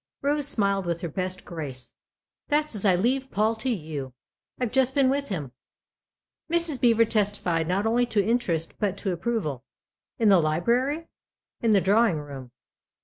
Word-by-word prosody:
Rose 290 0 +1
smiled 200 -7 +1
with 170 -1 -2
her 175 - -2
best 185 +3 -4
grace. 135 -8 -7 0.3
" - - -67
That's 300 -1 +1
as 210 -1 -2
I 190 -3 +5
leave 260 +8 +1
Paul 215 +1 +1
to 240 +4 -2
you. 150 - -4 0.5
I've 245 -4 -1
just 265 0 +2
been 270 -2 +4
with 280 +1 -1
him." 150 -10 -4 1.0
Mrs. 335 -5 +1
Beever 230 -2 +5
testified 200 -7 0
not 190 +4 0
only 240 +2 +2
to 205 -4 +1
interest, 180 -9 0
but 200 -2 -1
to 195 - -2
approval. 170 - -2 0.3
" - - -67
In 225 -2 +3
the 195 -3 +6
library? 240 - 0 0.2
" - - -67
" - - -54
In 230 - +1
the 205 -3 +5
drawing 205 -2 +3
room." 140 -4 -8
205 Hz, 180 wpm, -26 LUFS, 170-245 Hz, 1.0 s, the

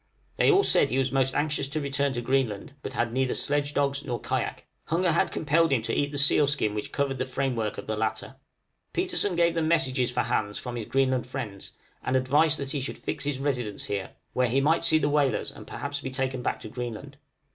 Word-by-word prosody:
They - - +4
all 395 0 +5
said 140 - +4
he 130 - 0
was 135 -1 +1
most 135 -1 +1
anxious 145 -2 0
to 155 +2 -1
return 140 -1 0
to 120 - -2
Greenland, 130 -2 0
but - - -6
had 115 -1 -1
neither 130 0 +1
sledge 145 0 -1
dogs 140 0 +1
nor 125 -4 -3
kayak; - - -3 0.2
hunger 170 +2 +1
had 170 - +2
compelled 160 +1 +2
him 125 -5 +2
to 115 - -2
eat 145 0 0
the 145 - -4
seal 140 0 +5
skin 135 -8 +1
which 105 0 -4
covered 135 -2 -1
the 130 - 0
framework 125 -5 -1
of - - -6
the 110 - -2
latter. 110 +4 -3 0.6
Petersen 350 - 0
gave 170 0 +3
them 165 -1 0
messages 130 -6 +2
for 125 0 0
Hans 105 -3 -1
from 125 -1 -5
his 115 -3 -5
Greenland 130 -2 +1
friends, 115 -7 -6 0.3
and 130 - 0
advice 145 +5 +3
that 140 -1 -4
he 145 -3 -2
should 130 - -4
fix - - -4
his 145 -2 -1
residence 125 -7 -2
here, 100 -2 -4 0.2
where 125 -1 +2
he 130 +4 +2
might 155 +4 +2
see 155 - +4
the 145 -2 +1
whalers 145 -5 +1
and - - -12
perhaps 145 0 -4
be 130 - -4
taken 130 -1 -2
back - - -1
to - - -7
Greenland. 125 +4 -6
135 Hz, 225 wpm, -27 LUFS, 125-145 Hz, 0.6 s, all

